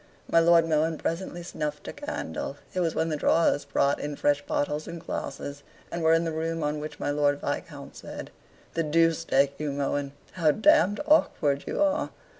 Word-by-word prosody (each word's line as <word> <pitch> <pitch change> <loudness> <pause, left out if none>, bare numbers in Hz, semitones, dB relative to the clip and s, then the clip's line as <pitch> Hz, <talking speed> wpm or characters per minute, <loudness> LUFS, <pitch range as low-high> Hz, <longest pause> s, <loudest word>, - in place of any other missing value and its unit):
My 165 - +4
Lord 165 0 +5
Mohun 160 0 +1
presently 175 +1 -3
snuffed 150 -3 -4
a - - -5
candle. 80 - -5 0.2
It 185 - -1
was 165 -3 0
when 160 - 0
the 155 - 0
drawers 150 0 +2
brought 140 0 +1
in 145 0 -4
fresh 145 0 +2
bottles 150 +1 -2
and 170 - -6
glasses 145 -1 -5 0.3
and 170 - -3
were 160 0 +5
in 165 - +2
the 165 - -2
room 165 0 -2
on 150 0 -1
which 150 0 -7
my - - -1
Lord 145 -1 +2
Viscount 145 -1 -5
said - - -8 0.4
"The 165 - 0
Deuce 165 +1 +2
take 140 0 +2
you, 150 -1 -2
Mohun, 140 0 -2 0.2
how 165 -4 +2
damned 220 - +4
awkward 150 - +2
you - - +1
are. 295 0 +1
155 Hz, 190 wpm, -27 LUFS, 145-165 Hz, 0.4 s, Lord